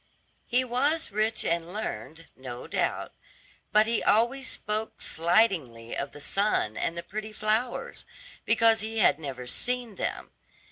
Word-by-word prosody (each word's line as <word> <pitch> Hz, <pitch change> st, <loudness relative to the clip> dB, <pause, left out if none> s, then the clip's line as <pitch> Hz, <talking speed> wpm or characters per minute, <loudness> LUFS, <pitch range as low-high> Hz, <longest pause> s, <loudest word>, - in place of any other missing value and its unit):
He 250 Hz, +2 st, +2 dB
was 275 Hz, +5 st, +1 dB
rich 215 Hz, +2 st, +1 dB
and 170 Hz, 0 st, -1 dB
learned, 165 Hz, -, -5 dB
no 125 Hz, -2 st, -8 dB
doubt, -, -, -1 dB, 0.6 s
but 215 Hz, +1 st, +6 dB
he 230 Hz, 0 st, 0 dB
always 240 Hz, +5 st, +2 dB
spoke 215 Hz, +1 st, -2 dB
slightingly 165 Hz, -, +1 dB
of 140 Hz, 0 st, -3 dB
the -, -, -11 dB
sun 195 Hz, -, +1 dB
and 165 Hz, -, -2 dB
the 170 Hz, -, -4 dB
pretty 215 Hz, +4 st, -6 dB
flowers, 215 Hz, +3 st, -1 dB, 0.4 s
because 225 Hz, 0 st, +4 dB
he 220 Hz, +1 st, -3 dB
had 190 Hz, -7 st, +4 dB
never 135 Hz, -5 st, -6 dB
seen 245 Hz, -, -2 dB
them. -, -, -3 dB
215 Hz, 140 wpm, -28 LUFS, 160-225 Hz, 0.6 s, but